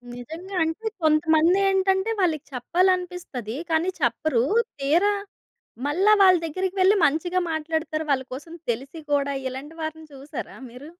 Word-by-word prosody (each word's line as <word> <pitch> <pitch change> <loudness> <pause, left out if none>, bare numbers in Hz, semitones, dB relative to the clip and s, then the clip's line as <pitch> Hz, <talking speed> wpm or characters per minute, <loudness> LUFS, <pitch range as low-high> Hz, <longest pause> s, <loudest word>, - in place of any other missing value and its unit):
నిజంగా 325 +10 -8
అంటే 325 +8 -3 0.2
కొంతమందేంటంటే 380 +6 +3
వాళ్ళకి 320 -5 +1
చెప్పాలనిపిస్తది. 350 - -1
కానీ 330 +3 +1
చెప్పరు. 240 0 +1 0.4
తీరా 335 +9 +3 0.7
మళ్ళా 380 +8 +3
వాళ్ళ 370 -2 +7
దగ్గరికెళ్లి 375 +4 +2
మంచిగా 350 +5 +1
మాట్లాడతారు. 315 0 -2
వాళ్ళ 265 -2 +2
కోసం 310 +5 -9 0.2
తెలిసి 270 +7 -5
కూడా 280 -1 +1
ఇలాంటి 280 +5 -8
వారిని 315 0 -5
చూసారా 275 +2 -8
మీరు? 255 +5 -11
320 Hz, 115 wpm, -24 LUFS, 285-370 Hz, 0.7 s, వాళ్ళ